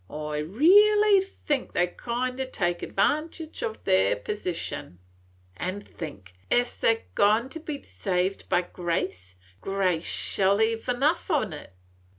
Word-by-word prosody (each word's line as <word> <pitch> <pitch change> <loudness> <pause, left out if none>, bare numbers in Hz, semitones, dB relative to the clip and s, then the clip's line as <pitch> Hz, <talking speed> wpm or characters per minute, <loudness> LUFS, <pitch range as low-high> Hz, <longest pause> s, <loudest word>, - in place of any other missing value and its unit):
I 150 0 -4
reelly 400 - +5
think 300 -8 -3
they 175 - +3
kind 250 +7 -3
o' - - 0
take 175 -2 -1
advantage 310 - -1
o' 220 - -1
their 95 - +2
position, 170 - -5 0.6
an' 185 +3 -3
think, 100 - -9 0.2
es 245 0 +2
they 225 - +3
're 225 - -14
goin' 215 +5 +3
to 325 - -7
be 300 -3 -6
saved 185 0 -2
by 180 - +3
grace, 165 - -3 0.3
grace 185 -4 0
shell 195 +2 +1
hev 225 +2 0
enough 285 +10 +1
on 270 - +1
't. 150 - -8
205 Hz, 140 wpm, -26 LUFS, 175-270 Hz, 0.6 s, reelly